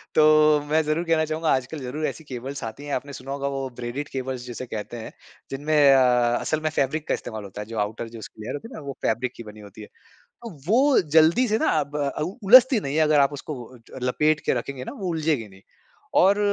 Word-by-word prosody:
तो 155 Hz, -, +6 dB, 0.5 s
मैं 155 Hz, +1 st, +3 dB
ज़रूर 155 Hz, +3 st, 0 dB
कहना 160 Hz, -1 st, +2 dB
चाहूँगा 155 Hz, +1 st, -2 dB
आजकल 130 Hz, +4 st, -2 dB
ज़रूर 140 Hz, +4 st, -4 dB
ऐसी 160 Hz, -, -6 dB
केबल्स 135 Hz, +1 st, -7 dB
आती 115 Hz, +6 st, -7 dB
हैं। 145 Hz, -, -4 dB
आपने 140 Hz, +2 st, -5 dB
सुना 135 Hz, +1 st, -8 dB
होगा 140 Hz, 0 st, -2 dB
वो 135 Hz, -1 st, -3 dB
ब्रेडेड 125 Hz, +5 st, -4 dB
केबल्स 130 Hz, -1 st, -5 dB
जिसे 125 Hz, 0 st, -6 dB
कहते 110 Hz, 0 st, -6 dB
हैं 110 Hz, -, -8 dB, 0.4 s
जिनमें 145 Hz, +1 st, +3 dB
अ, 125 Hz, -2 st, +3 dB
असल 155 Hz, -, -1 dB
में 155 Hz, -, 0 dB
फैब्रिक 150 Hz, 0 st, -1 dB
का -, -, +1 dB
इस्तेमाल 110 Hz, -2 st, -5 dB
होता 100 Hz, +1 st, -8 dB
है -, -, -6 dB
जो 115 Hz, -, -7 dB
आउटर 110 Hz, +3 st, -3 dB
जो 115 Hz, 0 st, -10 dB
उसकी 110 Hz, -, -11 dB
लेयर 110 Hz, -, -5 dB
होती 185 Hz, -, -8 dB
है 250 Hz, -, -13 dB
ना -, -, -8 dB
वो 140 Hz, -, -4 dB
फैब्रिक 120 Hz, +3 st, -1 dB
की 115 Hz, -, -9 dB
बनी 105 Hz, 0 st, -12 dB
होती 105 Hz, +1 st, -12 dB
है। 105 Hz, -, -10 dB, 0.6 s
अब 170 Hz, -11 st, -10 dB
वो 265 Hz, +8 st, +4 dB, 0.2 s
जल्दी 165 Hz, +11 st, +5 dB
से 220 Hz, -, +1 dB
ना -, -, 0 dB
अब 145 Hz, +1 st, -5 dB
अ, 140 Hz, -1 st, -2 dB
उ 180 Hz, +8 st, -4 dB
उलझती 255 Hz, +1 st, +7 dB
नहीं 140 Hz, -2 st, -3 dB
है 160 Hz, -, +4 dB
अगर 150 Hz, -1 st, +4 dB
आप 140 Hz, +1 st, +3 dB
उसको 145 Hz, +1 st, -6 dB
वो 125 Hz, -1 st, -11 dB
ज -, -, -9 dB
लपेट 150 Hz, +5 st, +1 dB
के -, -, +3 dB
रखेंगे 135 Hz, -2 st, -7 dB
ना -, -, -7 dB
वो 190 Hz, -, -3 dB
उलझेगी 155 Hz, -9 st, -1 dB
नहीं। 95 Hz, 0 st, -18 dB, 0.6 s
और 195 Hz, +3 st, +5 dB
140 Hz, 245 wpm, -24 LUFS, 120-155 Hz, 0.6 s, उलझती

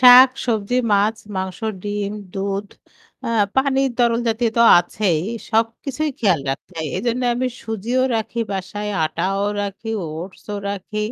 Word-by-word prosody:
শাক, 250 Hz, +1 st, +10 dB, 0.2 s
সবজি, 220 Hz, 0 st, 0 dB, 0.2 s
মাছ, 210 Hz, +2 st, +3 dB, 0.2 s
মাংস, 190 Hz, -1 st, -3 dB, 0.2 s
ডিম, 205 Hz, 0 st, -2 dB, 0.2 s
দুধ 195 Hz, +1 st, -2 dB, 0.6 s
আ -, -, -1 dB, 0.3 s
পানির 270 Hz, 0 st, +2 dB
তরল 235 Hz, -1 st, +3 dB
জাতীয় 225 Hz, +1 st, +1 dB
তো 235 Hz, -, +6 dB, 0.2 s
আছেই। 175 Hz, -2 st, 0 dB, 0.3 s
সবকিছুই 240 Hz, +7 st, 0 dB
খেয়াল 185 Hz, -9 st, +3 dB
রাখতে 135 Hz, +7 st, -6 dB
হয়। 160 Hz, -, -2 dB
এজন্যে 245 Hz, +1 st, 0 dB
আমি 255 Hz, +1 st, 0 dB, 0.2 s
সুজিও 225 Hz, +3 st, -1 dB, 0.2 s
রাখি 225 Hz, +2 st, -3 dB
বাসায়, 205 Hz, +2 st, -4 dB, 0.2 s
আটাও 190 Hz, +5 st, -1 dB, 0.2 s
রাখি, 200 Hz, +2 st, -5 dB, 0.2 s
ওটসও 180 Hz, +6 st, -6 dB
রাখি। 200 Hz, +2 st, -5 dB
210 Hz, 135 wpm, -21 LUFS, 195-240 Hz, 0.6 s, শাক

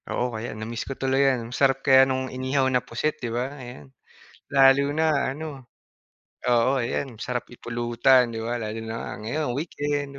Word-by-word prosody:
Oo, 125 Hz, 0 st, -1 dB
kaya 110 Hz, +1 st, -4 dB
na-miss 115 Hz, +2 st, -5 dB
ko 135 Hz, -, -5 dB
tuloy 135 Hz, +1 st, +1 dB
yan. 120 Hz, -2 st, -2 dB
Masarap 135 Hz, 0 st, +2 dB
kaya 135 Hz, 0 st, +6 dB
nung 130 Hz, 0 st, -1 dB
inihaw 130 Hz, +1 st, 0 dB
na 125 Hz, -, +3 dB
pusit, 135 Hz, +8 st, -3 dB
di 120 Hz, -, -3 dB
ba, 125 Hz, +4 st, -2 dB
ayan. 75 Hz, -, -11 dB, 0.6 s
Lalo 135 Hz, 0 st, +6 dB
na 155 Hz, -3 st, +1 dB
ano, 145 Hz, -2 st, -8 dB, 0.8 s
oo, 120 Hz, 0 st, +3 dB
ayan, 125 Hz, 0 st, -2 dB
sarap 125 Hz, +2 st, -4 dB
ipulutan, 120 Hz, +1 st, +2 dB
di 115 Hz, -1 st, -5 dB
ba, 120 Hz, +1 st, -2 dB
lalo 110 Hz, 0 st, -4 dB
na 115 Hz, 0 st, -5 dB
ngayon 130 Hz, +1 st, -2 dB
weekend, 145 Hz, -2 st, -3 dB
130 Hz, 165 wpm, -25 LUFS, 120-135 Hz, 0.8 s, kaya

